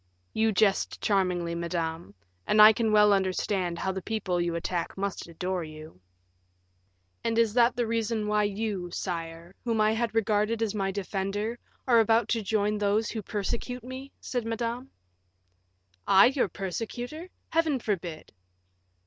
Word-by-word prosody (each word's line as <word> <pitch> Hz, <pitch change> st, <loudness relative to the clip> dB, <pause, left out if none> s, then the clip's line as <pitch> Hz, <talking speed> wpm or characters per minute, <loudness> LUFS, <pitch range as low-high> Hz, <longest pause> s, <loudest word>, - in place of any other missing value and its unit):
"You 220 Hz, 0 st, +2 dB
jest 200 Hz, -1 st, +1 dB
charmingly, 180 Hz, -4 st, 0 dB
madame; 165 Hz, -, -3 dB, 0.3 s
and 215 Hz, -, +3 dB
I 215 Hz, +1 st, +10 dB
can 225 Hz, 0 st, 0 dB
well 210 Hz, -1 st, +6 dB
understand 185 Hz, -2 st, 0 dB
how 190 Hz, -, -1 dB
the 190 Hz, 0 st, -4 dB
people 190 Hz, -4 st, -1 dB
you 170 Hz, -1 st, -1 dB
attack 170 Hz, +1 st, -3 dB
must 200 Hz, -2 st, -3 dB
adore 180 Hz, +2 st, -3 dB
you." 155 Hz, -, -11 dB, 1.2 s
"And 230 Hz, 0 st, 0 dB
is 230 Hz, -2 st, +3 dB
that 240 Hz, 0 st, +4 dB
the 240 Hz, -, 0 dB
reason 225 Hz, -1 st, -1 dB
why 210 Hz, 0 st, +2 dB
you, 205 Hz, -3 st, -3 dB
sire, 170 Hz, -1 st, -5 dB
whom 230 Hz, -2 st, 0 dB
I 215 Hz, 0 st, +4 dB
had 225 Hz, 0 st, -1 dB
regarded 220 Hz, +1 st, +1 dB
as 215 Hz, -2 st, -1 dB
my 195 Hz, -2 st, -1 dB
defender, 200 Hz, +3 st, -3 dB, 0.3 s
are 235 Hz, -2 st, +6 dB
about 225 Hz, 0 st, +3 dB
to 230 Hz, -, +1 dB
join 210 Hz, 0 st, 0 dB
these 210 Hz, +2 st, +1 dB
who 220 Hz, -, -4 dB
persecute 225 Hz, +5 st, -4 dB
me?" 260 Hz, +2 st, -8 dB
said 245 Hz, -2 st, -3 dB
Madame. 235 Hz, +3 st, -3 dB, 1.2 s
"I 195 Hz, 0 st, +7 dB
your 260 Hz, -8 st, +1 dB
persecutor! 240 Hz, -, -5 dB, 0.2 s
Heaven 325 Hz, -4 st, +2 dB
forbid!" 180 Hz, -9 st, -4 dB
210 Hz, 150 wpm, -28 LUFS, 185-225 Hz, 1.2 s, I